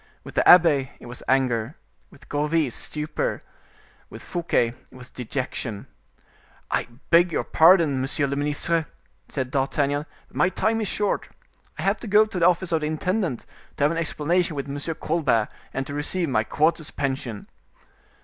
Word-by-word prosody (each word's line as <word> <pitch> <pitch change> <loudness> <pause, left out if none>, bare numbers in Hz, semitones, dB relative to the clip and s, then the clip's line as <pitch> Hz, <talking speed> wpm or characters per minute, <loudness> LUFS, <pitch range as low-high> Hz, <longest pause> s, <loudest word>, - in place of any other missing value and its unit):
With - - -10
the - - +3
abbe 155 -7 +6
it - - -13
was 120 +1 -9
anger, 130 0 +1 0.3
with 140 - -18
Gourville 150 -1 0
stupor, 155 - -2 0.7
with - - -10
Fouquet 170 -9 0 0.2
it - - -18
was 125 0 -11
dejection. 125 -3 -4 0.9
"I - - 0 0.2
beg 170 +1 +6
your - - 0
pardon, 160 -5 +5
monsieur 140 +2 0
le 140 0 -2
ministre," 150 +3 0 0.4
said 130 -2 -3
D'Artagnan, 145 +2 0 0.2
"but - - -23
my 180 - +3
time 220 +4 0
is 215 - -1
short; 205 0 -1 0.5
I - - -4
have - - +2
to 235 - -8
go 210 +1 +5
to 215 -4 -5
the 170 - +5
office 180 0 +1
of 160 -1 +1
the 150 - -1
intendant, 175 - -1 0.3
to - - 0
have 145 - +4
an 165 - -2
explanation 165 +1 0
with 140 0 -4
Monsieur 145 +3 -4
Colbert, 150 -11 +1 0.2
and 135 0 -3
to 145 - -7
receive 160 +3 -1
my 110 -4 +2
quarter's 155 +5 +1
pension." 130 -6 -3
150 Hz, 170 wpm, -24 LUFS, 135-170 Hz, 0.9 s, abbe